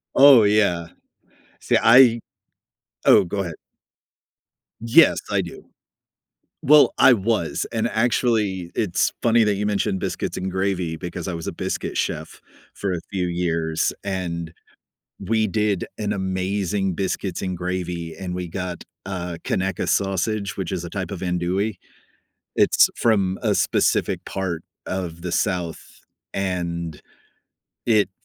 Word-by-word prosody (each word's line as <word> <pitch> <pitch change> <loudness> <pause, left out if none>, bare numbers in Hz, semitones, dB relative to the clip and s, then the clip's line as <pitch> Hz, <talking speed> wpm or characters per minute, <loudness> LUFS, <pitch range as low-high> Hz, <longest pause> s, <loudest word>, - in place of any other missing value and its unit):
Oh, 135 -4 +8
yeah. 100 -5 +2 0.7
See - - +2
I 120 0 +7 0.9
Oh, - - +6
go 100 +3 -2
ahead. 85 -4 -5 1.2
Yes, 135 +8 +5
I 100 - +2
do. 85 -2 -9 1.0
Well, 150 +1 +6
I 125 - +7
was. 105 -5 0
And 115 0 0
actually, 110 -6 0
it's 95 -5 +1
funny 115 -1 +4
that 105 -1 +2
you 105 +1 -2
mentioned 100 -2 0
"biscuits - - -3
and 95 +1 -3
gravy" 95 -3 -1
because 90 +2 -6
I 90 - -3
was 85 - -6
a - - -3
biscuit - - -4
chef - - -3 0.3
for 100 -2 -2
a 85 - -2
few 90 -2 -1
years, 85 -2 -1
and 85 -4 -4 0.7
we 110 +2 +1
did 105 -2 0
an 105 -1 -1
amazing 95 0 -1
biscuits 95 -1 -3
and 95 -1 -3
gravy, 90 -2 -4
and 90 -2 -5
we 90 -1 -4
got, 90 0 -5 0.2
uh, 90 -3 -4
Conecuh 95 -1 -1
sausage, 100 +1 0
which 95 -2 -4
is 90 -2 -3
a 85 - -7
type 95 -2 -4
of 95 -4 -6
Andouille. 90 +4 -1 0.8
It's - - +5
from 100 -5 +1
a - - +2
specific - - +1
part 90 -4 -3 0.2
of 85 -3 -4
the 90 -1 -4
South 90 -5 -1 0.5
and 85 -4 -3 0.9
it 105 -4 +3
95 Hz, 135 wpm, -22 LUFS, 90-105 Hz, 1.2 s, Oh